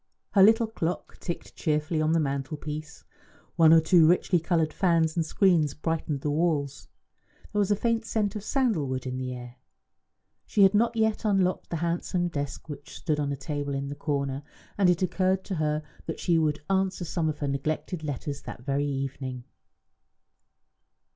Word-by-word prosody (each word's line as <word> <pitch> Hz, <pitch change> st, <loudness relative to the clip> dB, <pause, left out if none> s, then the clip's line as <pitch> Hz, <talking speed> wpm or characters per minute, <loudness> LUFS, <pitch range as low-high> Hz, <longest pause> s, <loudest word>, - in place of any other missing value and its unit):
Her 195 Hz, -, +4 dB
little 225 Hz, +3 st, +6 dB
clock 180 Hz, -6 st, -4 dB
ticked 170 Hz, -, -6 dB
cheerfully 155 Hz, +1 st, 0 dB
on 155 Hz, +1 st, +2 dB
the 165 Hz, -, +3 dB
mantelpiece, 150 Hz, +2 st, -4 dB, 0.5 s
one 165 Hz, -2 st, +6 dB
or 165 Hz, -, +8 dB
two 160 Hz, 0 st, +5 dB
richly 175 Hz, +1 st, +3 dB
coloured 165 Hz, -2 st, 0 dB
fans 165 Hz, -4 st, +2 dB
and 165 Hz, -, +1 dB
screens 160 Hz, -3 st, +2 dB
brightened 155 Hz, -3 st, -2 dB
the 150 Hz, -, -1 dB
walls; 145 Hz, -3 st, 0 dB, 0.7 s
there 210 Hz, -, +1 dB
was 200 Hz, -1 st, +2 dB
a 205 Hz, -, +4 dB
faint 230 Hz, +2 st, 0 dB
scent 215 Hz, -2 st, -1 dB
of 210 Hz, -, -5 dB
sandal 225 Hz, -, +1 dB
wood 130 Hz, 0 st, -3 dB
in 130 Hz, 0 st, -3 dB
the 130 Hz, 0 st, -3 dB
air. 125 Hz, 0 st, -8 dB, 0.9 s
She 205 Hz, -, +4 dB
had 195 Hz, +1 st, +6 dB
not 230 Hz, +3 st, +2 dB
yet 220 Hz, 0 st, +1 dB
unlocked 195 Hz, -4 st, +1 dB
the -, -, -2 dB
handsome 175 Hz, +1 st, -1 dB
desk 145 Hz, -2 st, -5 dB
which 145 Hz, -1 st, -9 dB
stood 150 Hz, -3 st, -1 dB
on 145 Hz, -1 st, -1 dB
a 140 Hz, -, -3 dB
table 145 Hz, 0 st, -3 dB
in 140 Hz, 0 st, -3 dB
the 145 Hz, -, -5 dB
corner, 140 Hz, -2 st, -2 dB, 0.3 s
and 195 Hz, -3 st, +4 dB
it 180 Hz, +1 st, +2 dB
occurred 185 Hz, +1 st, +1 dB
to 190 Hz, -, -4 dB
her 155 Hz, 0 st, 0 dB, 0.2 s
that 160 Hz, -, -4 dB
she 170 Hz, -2 st, +2 dB
would 150 Hz, -1 st, 0 dB
answer 190 Hz, -2 st, 0 dB
some 160 Hz, -1 st, -1 dB
of 150 Hz, -, -3 dB
her 145 Hz, -, -3 dB
neglected 155 Hz, +4 st, -2 dB
letters 145 Hz, 0 st, -4 dB
that 120 Hz, -, -9 dB
very 140 Hz, +1 st, 0 dB
evening. 135 Hz, -2 st, -4 dB
160 Hz, 180 wpm, -27 LUFS, 145-185 Hz, 0.9 s, or